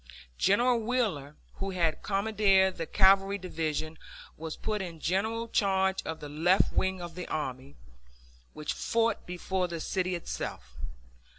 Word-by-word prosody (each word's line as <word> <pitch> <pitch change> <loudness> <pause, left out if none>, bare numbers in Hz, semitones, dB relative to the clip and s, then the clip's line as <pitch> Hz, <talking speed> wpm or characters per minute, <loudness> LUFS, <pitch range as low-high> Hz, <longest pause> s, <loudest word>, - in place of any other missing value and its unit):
General 240 +4 +4
Wheeler, 215 - -1 0.2
who 195 - -3
had 170 -4 0
commanded 195 -2 +3
the 165 -2 -3
Cavalry 195 0 +4
Division, 160 -3 -3 0.4
was 160 0 -6
put 215 -2 -2
in 170 -3 -6
general 220 +7 0
charge 190 -3 +2
of 160 0 -4
the 150 - -6
left 165 +6 +2
wing 190 0 +1
of 175 -1 -7
the 180 +1 -6
army, 135 -2 -4 0.8
which 150 - -3
fought 230 -2 0
before 180 +1 -2
the 170 -1 -5
city 185 +2 -1
itself. 65 - -6
185 Hz, 135 wpm, -29 LUFS, 160-200 Hz, 0.8 s, General